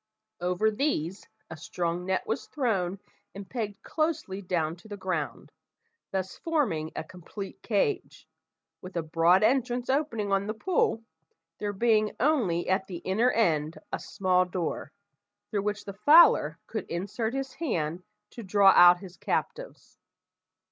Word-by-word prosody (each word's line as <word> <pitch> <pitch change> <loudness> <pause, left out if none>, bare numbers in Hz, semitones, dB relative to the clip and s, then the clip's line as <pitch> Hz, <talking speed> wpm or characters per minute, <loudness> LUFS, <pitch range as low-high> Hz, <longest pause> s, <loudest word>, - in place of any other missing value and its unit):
Over 180 +5 +1
these 210 - -2 0.2
a - - -5
strong 170 +3 -3
net 190 0 0
was 225 - -3
thrown 200 - -1 0.4
and 200 -1 -8
pegged 215 -5 -5
closely 310 -12 -2
down 170 -4 -1
to 175 - -16
the 205 -1 -7
ground, 185 -6 -4 0.6
thus 190 -1 -3
forming 230 - -1
a - - -3
complete 185 +4 -9
cage, 435 -4 -1 0.5
with 185 -1 -7
a 170 - 0
broad 165 +4 +3
entrance 250 +1 +1
opening 230 -8 -1
on 195 +1 +1
the 215 - -3
pool, 375 - 0 0.6
there 205 -1 -2
being 215 0 +2
only 230 - +1
at 190 +1 +1
the 180 - -6
inner 210 +8 +1
end 160 -10 +1 0.2
a - - -1
small 185 -2 +1
door, 180 -1 -4 0.6
through 205 -3 0
which 210 0 -3
the 200 - -6
fowler 295 - +6
could - - -5
insert 205 +7 -3
his 270 0 -3
hand 175 - -2 0.3
to 235 - -9
draw 200 -1 +5
out 175 -1 +8
his 185 -3 -11
captives. - - -4
200 Hz, 145 wpm, -28 LUFS, 180-235 Hz, 0.6 s, out